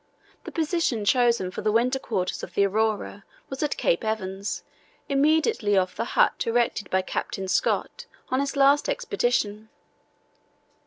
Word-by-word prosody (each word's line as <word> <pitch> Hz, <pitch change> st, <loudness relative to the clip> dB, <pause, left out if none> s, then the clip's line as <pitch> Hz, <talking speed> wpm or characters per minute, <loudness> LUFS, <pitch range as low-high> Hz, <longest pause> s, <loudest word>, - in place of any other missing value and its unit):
The -, -, -6 dB
position 320 Hz, -, 0 dB
chosen 235 Hz, -5 st, +2 dB
for -, -, -5 dB
the 215 Hz, -, +1 dB
winter 250 Hz, +4 st, +2 dB
quarters 185 Hz, -8 st, -2 dB
of -, -, -9 dB
the 200 Hz, -, +4 dB
Aurora 210 Hz, 0 st, -1 dB, 0.3 s
was 270 Hz, -, -5 dB
at 300 Hz, -1 st, -1 dB
Cape -, -, +1 dB
Evans, 200 Hz, -2 st, -3 dB, 0.4 s
immediately 290 Hz, -, +2 dB
off 185 Hz, -1 st, +1 dB
the -, -, -2 dB
hut -, -, +3 dB
erected 230 Hz, -4 st, 0 dB
by 190 Hz, 0 st, +1 dB
Captain 190 Hz, +1 st, -4 dB
Scott 475 Hz, -, -1 dB, 0.2 s
on 260 Hz, -, +2 dB
his 280 Hz, 0 st, -2 dB
last 280 Hz, -, +4 dB
Expedition. 240 Hz, -, -1 dB
230 Hz, 145 wpm, -25 LUFS, 205-280 Hz, 0.4 s, the